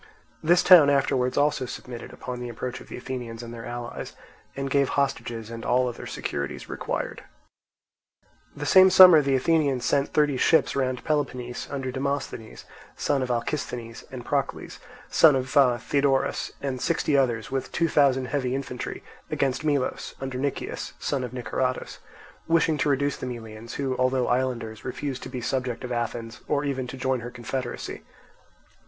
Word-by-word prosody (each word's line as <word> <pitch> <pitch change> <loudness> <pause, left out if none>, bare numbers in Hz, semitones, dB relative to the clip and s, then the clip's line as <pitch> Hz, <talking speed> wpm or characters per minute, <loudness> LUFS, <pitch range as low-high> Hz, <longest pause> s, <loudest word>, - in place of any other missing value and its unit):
This 175 +3 +4
town 170 -6 +8
afterwards 135 -2 +1
also 145 -3 +2
submitted 120 -1 -8
upon 125 -1 -6
the 125 0 -5
approach 125 +2 -5
of - - -13
the - - -7
Athenians 120 -2 -6
and 120 0 -8
their 115 0 -8
allies, 120 0 -6 0.4
and 135 0 -3
gave 140 0 +2
hostages 120 -5 -2
and 115 0 -7
all 125 +1 +2
other 120 - -6
securities 70 -1 -4
required. - - -4 1.3
The 145 - -4
same 190 +5 +7
summer 180 -4 +9
the 135 -1 +1
Athenians 140 -2 +2
sent 140 0 +2
thirty 150 -3 +2
ships 160 - +3
round 130 -2 -1
Peloponnese 125 -5 -2
under 135 -2 -3
Demosthenes, 135 -4 -4 0.3
son 140 -2 +1
of 130 - -2
Alcisthenes, 120 -2 -3
and 125 -2 -7
Procles, 140 -1 -2 0.3
son 155 -4 +6
of 130 0 -2 0.3
Theodorus, 140 -2 +1
and 130 -3 -2
sixty 155 -3 +1
others, 125 -2 +1
with 135 -1 -2
two 165 - +1
thousand 135 -4 +3
heavy 130 -3 -1
infantry, 130 -2 -5 0.3
against 135 +2 0
Melos, 145 -4 -1
under 130 -1 -4
Nicias, 140 0 -3
son 140 -3 -2
of 125 - -5
Niceratus; 130 +1 -2 0.5
wishing 165 -2 +3
to 150 - +2
reduce 140 0 +1
the - - -5
Melians, 115 -2 -7
who, 135 -2 -1
although 130 0 +2
islanders, 120 -4 -1
refused 130 0 -4
to - - -7
be 125 - -5
subjects 125 0 -2
of 125 - -6
Athens 120 -1 -3
or 145 0 0
even 130 -2 -2
to 135 - -7
join 130 0 0
her 120 +1 -6
confederacy. 120 +1 -5
130 Hz, 160 wpm, -26 LUFS, 120-140 Hz, 1.3 s, summer